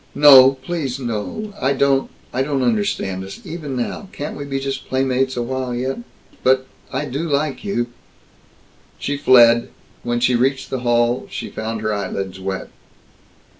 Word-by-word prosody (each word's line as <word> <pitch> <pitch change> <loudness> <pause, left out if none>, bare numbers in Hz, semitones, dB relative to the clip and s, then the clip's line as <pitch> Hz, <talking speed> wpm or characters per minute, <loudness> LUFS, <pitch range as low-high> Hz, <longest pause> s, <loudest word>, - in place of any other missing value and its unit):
"No! 135 -2 +9
Please 140 -5 -3
no! 125 - -4
I 135 +2 +2
don't 135 0 +2 0.2
I 130 - 0
don't 135 -1 0
understand 100 -5 0
us, 95 - -9
even 150 -5 -5
now. 125 - -3
Can't 145 -7 -5
we 145 - -6
be 135 -1 -2
just 135 0 -4
playmates 130 0 0
a 120 - 0
while 130 0 -3
yet? 130 - -2 0.4
But 130 0 +3 0.3
I 150 - -2
do 135 0 -4
like 145 +3 -1
you!" 200 -13 -1 1.1
She 145 - -2
fled. 120 -4 +6 0.3
When 120 0 -1
she 125 +1 +3
reached 130 +3 +1
the 130 - -1
hall 120 0 +1
she - - -6
found 110 0 -4
her 110 0 0
eyelids 95 -1 -4
wet. 95 0 -4
130 Hz, 160 wpm, -20 LUFS, 120-140 Hz, 1.1 s, No